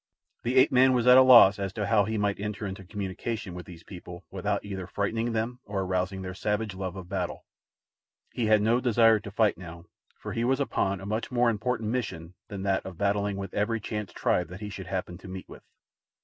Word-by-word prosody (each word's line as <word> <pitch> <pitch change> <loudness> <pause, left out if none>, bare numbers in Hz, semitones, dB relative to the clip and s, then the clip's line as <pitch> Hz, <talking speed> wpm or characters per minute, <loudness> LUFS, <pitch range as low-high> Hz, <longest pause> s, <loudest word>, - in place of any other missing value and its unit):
The 120 +2 -2
ape 130 - +6
man 130 0 +5
was 125 -2 +1
at 125 +1 +8
a - - +9
loss 120 -6 +8
as 100 -1 -2
to 105 - -2
how 105 -2 +3
he 110 +1 -2
might 100 -1 0
enter 105 +1 -4
into 95 0 -6
communication 100 +1 -5
with 90 0 -8
these 85 -2 -12
people 90 -2 -10
without - - -2
either 95 -3 -5
frightening 115 +5 -1
them 115 +3 -2
or 100 -1 -3
arousing 95 +1 -2
their 95 0 -5
savage 105 +2 -2
love 95 -1 -5
of 95 -2 -8
battle. 90 -2 -4 0.9
He 115 -3 -1
had 105 -1 +4
no 115 +3 +3
desire 115 -3 +4
to 105 0 -9
fight 105 -3 +1
now, 85 -1 -10 0.3
for - - -7
he 115 - -1
was 130 +3 +1
upon 100 -8 -1
a - - -8
much 110 +3 -2
more 120 -1 +2
important 115 0 -2
mission 90 -9 -4
than 100 -3 -6
that 95 -1 0
of 95 -3 -9
battling 100 0 0
with 95 -2 -6
every 110 +2 0
chance 105 -1 -5
tribe 90 - 0
that 90 +4 -10
he 105 - -5
should 95 -2 -8
happen 90 -2 -4
to 95 - -12
meet 95 0 -8
with. - - -12
100 Hz, 220 wpm, -27 LUFS, 95-115 Hz, 0.9 s, a